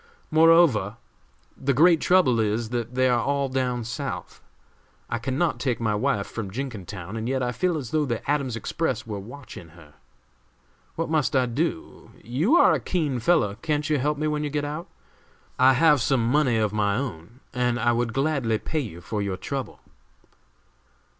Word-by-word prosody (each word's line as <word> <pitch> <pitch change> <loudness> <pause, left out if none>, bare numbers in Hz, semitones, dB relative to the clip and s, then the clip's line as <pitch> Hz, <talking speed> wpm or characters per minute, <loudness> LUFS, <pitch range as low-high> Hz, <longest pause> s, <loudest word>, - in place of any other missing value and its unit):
Moreover, 155 - +4 0.6
the 140 0 -1
great 165 +3 +5
trouble 175 -11 +4
is, 110 +1 0
that 120 0 -4
they 130 0 +3
are 120 -2 +2
all 140 -1 0
down 125 -2 -1
South. 130 +5 -6 0.7
I 115 - -1
can 130 +2 -3
not 155 -8 0
take 125 -2 -1
my 110 -2 0
wife 105 -2 0
from 110 -4 -6
Jenkintown, 105 -5 -6
and 115 +2 -3
yet 130 -1 0
I 125 - 0
feel 175 +5 0
as 125 -6 -6
though 155 -1 +1
the 120 -3 -4
Adams 140 -4 0
Express 130 +1 -2
were 105 -3 -5
watching 115 -4 -10
her. 75 -3 -16 1.0
What 165 -1 -3
must 155 -4 +1
I 130 -1 +4
do? 125 - -4
You 145 - +1
are 350 - +6
a - - +1
keen 150 -8 -1
fellow; 115 -6 +2
can't 150 -1 -1
you 150 - +2
help 150 +3 0
me 155 - -2
when 150 0 -1
you 150 - -2
get 145 0 -2
out? 150 +4 -5 0.7
I 130 +1 +6
have 150 0 +4
some 130 -2 +1
money 135 -5 +3
of 110 -2 0
my 100 -1 +1
own, 115 -3 -6
and 125 -1 0
I 120 - +2
would 120 0 0
gladly 135 -4 0
pay 155 +8 -3
you 100 - -6
for 105 +3 -3
your 100 -2 -2
trouble." 135 +2 -5
130 Hz, 180 wpm, -25 LUFS, 115-150 Hz, 1.0 s, are